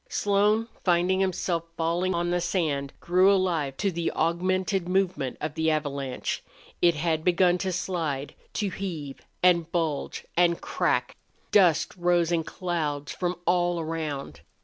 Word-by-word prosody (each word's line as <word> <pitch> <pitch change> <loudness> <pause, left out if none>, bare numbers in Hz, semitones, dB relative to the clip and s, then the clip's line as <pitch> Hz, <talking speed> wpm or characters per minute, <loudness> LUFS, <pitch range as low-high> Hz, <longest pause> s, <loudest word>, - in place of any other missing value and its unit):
Slone, 210 +2 +2 0.2
finding 180 +1 +2
himself 180 -3 0
falling 170 +3 0
on 175 0 0
the 175 0 +1
sand, 155 -6 -1
grew 185 +3 +4
alive 170 -8 +1
to 200 -1 0
the 170 -1 -1
augmented 185 +3 0
movement 185 -8 0
of 155 -1 -3
the 160 0 +1
avalanche. 140 -4 -2 0.4
It 170 -2 +5
had 160 0 0
begun 180 0 +3
to 190 0 -1
slide, 165 -6 -2 0.2
to 205 -2 -1
heave 165 -8 -5 0.2
and 170 -2 +4
bulge 160 -5 -2
and 170 -1 +3
crack. - - -1 0.3
Dust 170 -5 +4
rose 175 -1 +2
in 165 -1 +1
clouds 155 -6 -3
from 180 0 -2
all 175 0 +2
around. 155 -3 -4
175 Hz, 140 wpm, -26 LUFS, 160-185 Hz, 0.4 s, It